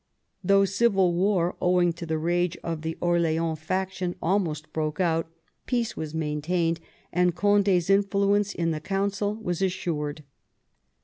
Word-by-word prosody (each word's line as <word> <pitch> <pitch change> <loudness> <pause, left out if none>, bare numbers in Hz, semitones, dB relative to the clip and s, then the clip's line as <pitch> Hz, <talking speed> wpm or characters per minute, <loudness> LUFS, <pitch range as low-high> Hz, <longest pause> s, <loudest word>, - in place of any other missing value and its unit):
Though 195 +2 +4
civil 195 -3 +2
war, 180 -1 +1
owing 180 -1 +3
to 170 0 -8
the 160 0 0
rage 175 +2 0
of 165 -2 -3
the 160 +1 -4
Orleans 165 -2 +1
faction, 185 +2 -2
almost 165 -4 -1
broke 155 0 -2
out, 165 -3 +1 0.4
peace 240 -3 -1
was 155 0 -5
maintained, 165 +2 -1 0.3
and 180 -1 +2
Condi's 200 -2 +3
influence 200 +1 +2
in 165 -3 -1
the 155 -1 -3
Council 200 +3 -1
was 180 -5 -3
assured. 155 -5 -2
175 Hz, 135 wpm, -26 LUFS, 160-195 Hz, 0.4 s, Though